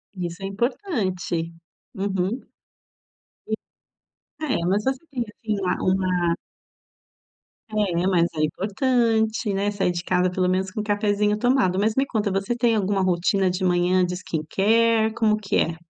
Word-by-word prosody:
Isso 175 +1 -5
é - - -2
importante, 195 - -2 0.4
uhum, 190 -2 -1
hum - - -13 2.0
é, 260 - 0
mas 205 +3 +1
você 265 0 0
tem 245 -3 -1
assim 215 0 -4
uma 180 - 0 0.2
uma 180 -3 +1 1.4
É, 185 -5 0
mas 170 -3 +3
é 155 - 0
importante, 220 - +1
né, 200 +1 0
sair 195 -3 0
de 175 0 -4
casa 180 0 +2
pelo 180 0 0
menos, 185 +1 0
com 210 +3 -4
um - - -5
cafezinho 210 0 +1
tomado. 245 -6 +2
Mas 215 +1 +1
me 270 +1 +2
conta, 215 -5 -1
você 195 +5 -1
tem 235 -2 +2
alguma 200 -1 +1
rotina 185 +1 +2
de 185 +1 -2
manhã 180 0 +3
de 180 - -3
skincare, 220 +7 +2
como 215 -1 +2
que 205 -1 -3
é? 165 0 +1
195 Hz, 150 wpm, -24 LUFS, 180-220 Hz, 2.0 s, mas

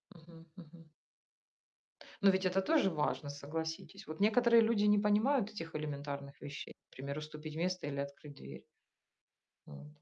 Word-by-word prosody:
Мгм 165 0 -15
мгм. 165 -1 -14 1.3
Ну 195 - +8
ведь 190 0 +2
это 185 +1 +2
тоже 245 -3 +3
важно, 150 -2 -1
согласитесь. 160 +3 -5
Вот 155 +1 -7
некоторые 235 +3 +5
люди 220 -2 +3
не 210 0 +5
понимают 215 +3 +3
этих 165 -5 -7
элементарных 140 -2 -5
вещей. 145 0 -7 0.2
Пример, 140 +2 -5
уступить 155 0 -7
место 180 0 -1
или 140 - -4
открыть 140 +1 -6
дверь. 65 - -10 1.0
Вот. 75 - -11
160 Hz, 140 wpm, -34 LUFS, 145-200 Hz, 1.3 s, Ну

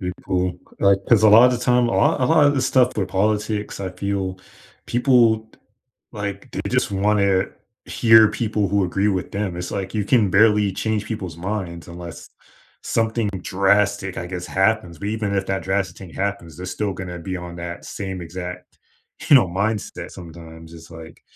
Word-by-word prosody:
people 90 -1 -3 0.2
like, 100 -1 +4
'cause 115 -3 +5
a 110 - +7
lot 115 +4 +8
of 125 - 0
the 120 - -5
time, 125 -1 +3
a - - -2
lot 145 -1 +2
a - - +3
lot 160 -2 +5
of 145 - +3
the 135 - 0
stuff 125 -1 +2
with 100 -3 -1
politics, 105 +2 -1
I 95 -2 -4
feel 95 0 -3 0.5
people 120 -3 +3
t - - -24 0.5
like, 100 -2 -6
they - - -4
just - - +1
wanna 100 -1 +2 0.4
hear 110 -2 +5
people 110 -2 -1
who 100 0 +1
agree 95 +3 0
with 95 -4 -2
them, 100 -3 -3
it's 90 0 -5
like 95 0 -4
you 105 -2 0
can 105 -2 +3
barely 105 0 +4
change 105 +2 -2
people's 95 -8 -6
minds 90 -2 -5
unless 85 -1 -9 0.5
something 115 -1 0
drastic, 100 0 +1
I 90 - -5
guess, 90 -1 -6
happens, 95 -4 0
but 100 - -4
even 105 -2 -2
if 95 -1 -1
that 95 0 -2
drastic 95 -2 -2
thing 95 -3 -10
happens, 90 -3 -4
they're 90 - -7
still 100 +2 -2
gonna 90 -1 -6
to - - -7
be 95 +2 -4
on 90 -1 -8
that 85 0 -7
same 95 -2 -6
exact, 90 +1 -8 0.5
you 145 - +8
know, 120 - +5
mindset 100 +4 -3
sometimes, 80 -1 -12
it's 80 0 -13
like 80 0 -12
100 Hz, 190 wpm, -21 LUFS, 90-110 Hz, 0.5 s, lot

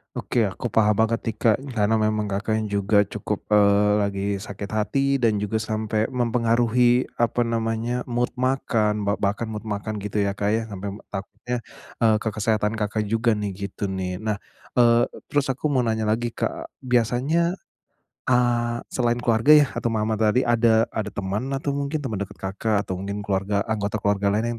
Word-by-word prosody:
Oke. 115 -3 0
Aku 100 +5 -4
paham 105 0 +3
banget 115 +1 +1
nih 115 - -1
Kak, 110 -3 +4 0.2
karena 110 0 +2
memang 110 -1 0
Kakaknya 110 +2 -1
juga 100 +1 +3
cukup, 105 - -4
eee, 105 0 +4
lagi 100 -1 -1
sakit 100 0 -7
hati 135 +6 +1
dan 110 -5 +1
juga 105 +2 -1
sampe 110 0 -1
mempengaruhi, 120 0 +2
apa 120 +1 +1
namanya, 115 +1 -1
mood 120 0 0
makan, 115 -5 +1
ba 100 +1 0
bahkan 105 +3 -1
mood 110 0 -6
makan 105 +1 -3
gitu 105 0 -2
ya 100 0 -1
Kak 100 0 0
ya, 115 - +1
sampe, 100 -1 -7
m 105 - -10
takutnya, 105 +5 -5 0.4
eee, 110 -2 +4
ke 110 - -1
kesehatan 110 0 0
Kakak 105 0 -2
juga 115 0 +2
nih, 105 -1 -2
gitu 100 0 -4
nih. 95 0 -3
Nah, 105 -1 -1 0.4
eee 120 0 +5
eee, - - -14
terus 140 -2 +2
aku 135 +3 -3
mau 130 - +3
nanya 110 -2 0
lagi, 115 +2 0
Kak. - - -4 0.2
Biasanya, 130 - +1 0.7
a 125 - +3 0.6
selain 120 -1 0
keluarga 120 +5 +5
yah 145 -6 +5
atau - - -2
mama 110 0 0
tadi 110 +4 +3
ada 115 -1 +3
ada 105 -1 -3
teman 100 +5 -2
atau 140 +1 -2
mungkin 140 +2 -2
teman 110 -7 -3
dekat 100 0 -5
Kakak, 100 +2 0
atau 95 -2 -5
mungkin 100 +1 -4
keluarga 100 0 0
anggota 105 -1 -2
keluarga 100 0 +1
lain 115 +2 -1
110 Hz, 180 wpm, -24 LUFS, 105-120 Hz, 0.7 s, eee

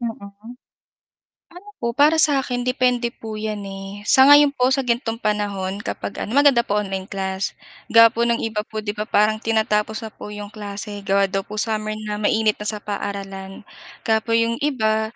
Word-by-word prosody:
Mm. 225 0 -8 1.0
Ano 400 +3 -12
po 235 0 -2
para 305 +3 +4
sa 290 -3 +5
akin 245 0 -3
depende 250 -1 +1
po 220 -1 -7
'yan, 215 -1 -4
eh. 195 +1 -8
Sa 265 +5 +6
ngayon 290 0 +7
po 260 -1 +1
sa 270 - +1
ganitong 235 -1 -2
panahon 200 -2 -2
kapag 205 - -5
ano 230 - -4
maganda 280 -5 +5
po 205 - 0
online 190 -1 -5
class. 190 -1 -3 0.3
Gawa 230 0 +7
po 235 +1 0
ng 235 0 0
iba 215 -1 -2
po 215 0 -5
'di 205 - -2
ba 210 0 -5
parang 215 0 +2
tinatapos 220 0 0
na 220 - -7
po - - -10
'yong 205 0 -8
klase 205 0 -6
gawa 195 0 +2
daw 195 0 -2
po 215 - -7
summer 215 0 -1
na, 210 -1 -5
mainit 215 0 +1
na 210 - -4
sa 210 -1 -2
paaralan. 195 -1 -6 0.4
Kaya 220 -1 +2
po 230 0 -1
'yong 230 0 +1
iba, 220 -6 0
215 Hz, 190 wpm, -21 LUFS, 205-235 Hz, 1.0 s, ngayon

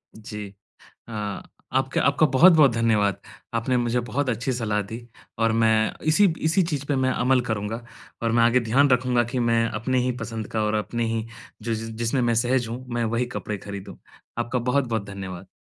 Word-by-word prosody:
जी। 105 -1 -7 0.6
अ, - - -10 0.6
आपका - - +1
आपका 155 - +4
बहुत-बहुत 150 0 +6
धन्यवाद। 110 -4 +2 0.3
आपने 115 +2 +1
मुझे 120 0 +1
बहुत 140 0 -1
अच्छी 120 +2 -1
सलाह 110 -3 -1
दी 115 - -5 0.4
और 115 0 +3
मैं 110 -1 +3 0.2
इसी 160 +7 +5 0.2
इसी 185 +4 +3
चीज़ 150 -5 -3
पे 145 - +1
मैं 130 0 +2
अमल 125 +1 +2
करूँगा 110 +2 -3 0.4
और 115 - +1
मैं 115 0 +4
आगे 120 +2 +4
ध्यान 130 +5 +3
रखूँगा 125 -1 +3
कि 130 - 0
मैं 115 0 +3
अपने 125 +4 -1
ही 125 - +1
पसंद 115 -3 -5
का 110 -1 0
और 105 0 0
अपने 115 +3 -1
ही 110 -1 -2 0.4
जिस 115 0 -3
जिसमें 120 +3 0
मैं 120 -1 +2
सहज 120 +1 +1
हूँ, 125 +3 -6
मैं 120 -1 -1
वही 115 +2 0
कपड़े 105 -1 -3
खरीदूँ। 100 0 -8 0.4
आपका 120 +1 -1
बहुत-बहुत 120 -4 0
धन्यवाद। 95 -2 -7
115 Hz, 180 wpm, -24 LUFS, 110-130 Hz, 0.6 s, बहुत-बहुत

